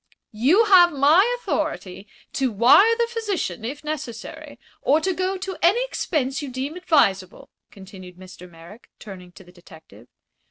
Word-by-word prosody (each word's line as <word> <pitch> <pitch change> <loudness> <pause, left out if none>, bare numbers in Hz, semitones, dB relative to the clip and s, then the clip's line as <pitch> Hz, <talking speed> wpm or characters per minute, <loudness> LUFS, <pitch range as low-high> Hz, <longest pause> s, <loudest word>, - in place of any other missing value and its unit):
"You 295 - +3
have 360 -4 +6
my 310 - +3
authority 195 - -5 0.3
to 265 -3 -1
wire 255 - +5
the 470 - +1
physician, 425 - -4
if 275 +7 -7
necessary, 275 -7 -8 0.2
or 295 +3 +2
to 375 +4 -2
go 375 +2 -3
to 380 -1 -7
any 405 +9 +2
expense 280 - -3
you 285 - -7
deem 265 +5 -6
advisable," 200 - -1 0.2
continued 190 -3 -14
Mr. 185 -1 -14
Merrick, 170 +7 -16
turning 185 -4 -12
to 190 - -15
the 180 - -19
detective. 160 - -18
265 Hz, 150 wpm, -22 LUFS, -, 0.3 s, have